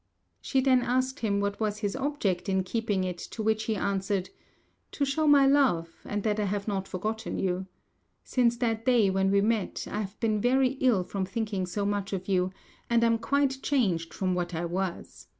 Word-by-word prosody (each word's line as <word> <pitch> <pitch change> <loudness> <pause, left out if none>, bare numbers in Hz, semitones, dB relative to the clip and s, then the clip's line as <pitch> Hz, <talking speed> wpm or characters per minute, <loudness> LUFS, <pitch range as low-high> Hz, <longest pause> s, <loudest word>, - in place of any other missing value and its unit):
She 270 - +1
then 255 -1 +4
asked 255 +3 0
him 205 -4 0
what 200 0 -2
was 210 -1 -1
his 205 0 -2
object 265 -10 -1
in 190 -1 +1
keeping 205 -1 -1
it, 180 -1 -3
to 220 - -6
which 220 0 +1
he 220 - 0
answered, 195 -1 -1 0.6
"To 280 - 0
show 300 +3 0
my 285 -2 +7
love, 260 -13 +3
and 205 -1 -3
that 215 -1 0
I 210 - +1
have 200 +1 -2
not 195 -2 -2
forgotten 215 +4 -3
you. 185 0 -1 0.6
Since 240 -2 +2
that 225 -2 -1
day 235 -6 +4
when 190 0 +2
we 200 0 +3
met, 220 -1 -1
I 210 - -3
have 200 -1 -7
been 215 -2 +1
very 255 +2 +3
ill 235 -8 +3
from 190 +1 -3
thinking 200 -2 -2
so 200 +3 -2
much 200 -1 -2
of 185 -1 -4
you, 185 -1 +1 0.4
and 235 -1 +3
am 230 -1 +3
quite 275 +1 +1
changed 185 - 0
from 185 -1 -1
what 175 -1 -2
I 165 +2 -2
was. 180 +1 -4
210 Hz, 200 wpm, -28 LUFS, 190-240 Hz, 0.6 s, my